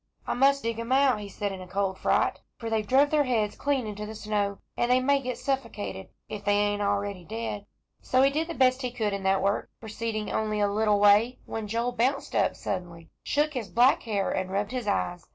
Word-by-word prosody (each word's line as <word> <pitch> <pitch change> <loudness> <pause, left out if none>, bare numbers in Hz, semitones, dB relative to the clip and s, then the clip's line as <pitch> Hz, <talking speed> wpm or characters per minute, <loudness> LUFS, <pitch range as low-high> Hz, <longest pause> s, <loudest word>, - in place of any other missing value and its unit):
"I - - -1
must 275 +2 +3
dig 230 0 -2
'em 230 +2 -5
out," 265 -4 +4
he 205 -1 -7
said 205 +1 -3
to 195 - -6
himself - - -10
in 180 - -10
a - - -18
cold 195 -1 -1
fright, - - +1 0.2
"for 230 -1 -5
they've 215 -2 0
druv 275 +4 +4
their 300 -2 +3
heads 220 -5 0
clean 275 -4 0
into 210 0 -5
the 220 - -7
snow, 205 -2 -1 0.2
and 240 - 0
they 250 +1 +5
may 280 +2 +2
get 250 -2 -4
stuffocated, 100 - -3 0.2
if 205 -1 -6
they 205 0 +2
ain't 205 0 +1
already 200 -2 -1
dead." 215 0 -5 0.3
So 255 +1 +3
he 275 - +4
did 315 +3 -1
the 335 - -5
best 255 0 +3
he 250 - -1
could 220 -4 -2
in 200 - -3
that 190 0 +2
work, 200 +1 0
proceeding 220 -1 -4
only 215 -1 -1
a 205 - +3
little 210 0 +2
way, 205 +4 +5
when 220 -1 -5
Joel 230 +3 -1
bounced 255 +4 -1
up - - +2
suddenly, 170 -4 -5
shook 300 +1 0
his 235 -7 -4
black 240 +9 +4
hair, 205 -4 -1
and 185 0 -2
rubbed 205 +2 -1
his 250 -4 -4
eyes. 180 -3 -1
215 Hz, 235 wpm, -27 LUFS, 200-255 Hz, 0.3 s, they